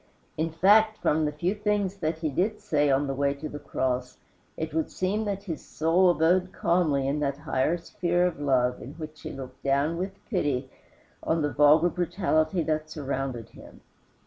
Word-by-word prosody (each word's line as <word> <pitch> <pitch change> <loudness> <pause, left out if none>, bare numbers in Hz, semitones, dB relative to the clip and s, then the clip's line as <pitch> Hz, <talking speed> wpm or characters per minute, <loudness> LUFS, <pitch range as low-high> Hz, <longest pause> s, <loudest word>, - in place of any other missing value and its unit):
In 160 +1 -1
fact, 210 +6 +4
from 155 +1 +1
the 150 - 0
few 170 +6 -1
things 205 -2 -1
that 160 -3 -2
he 160 -1 -2
did 205 +9 0
say 150 -8 +1
on 135 +1 +2
the 135 - -2
way 140 +1 0
to 155 +2 -6
the 145 0 -7
cross, 125 -2 -2 0.4
it 160 -1 -4
would 160 0 0
seem 205 +4 -1
that 200 -1 -3
his 165 -6 -5
soul 170 +4 +2
abode 180 +2 +2
calmly 160 -8 +1
in 145 +2 0
that 140 -1 -1
higher 150 +2 0
sphere 175 +1 0
of 180 -4 -2
love 125 -3 +1
in 135 - -8
which 155 -1 -9
he - - -6
looked 130 -1 -9
down 140 +4 +1
with 190 +2 -3
pity 140 - -1 0.5
on 160 -1 0
the 145 -2 -1
vulgar 150 +5 +5
brutality 175 -1 0
that 155 -1 -1
surrounded 135 -6 -4
him. - - -15
155 Hz, 185 wpm, -27 LUFS, 140-180 Hz, 0.5 s, vulgar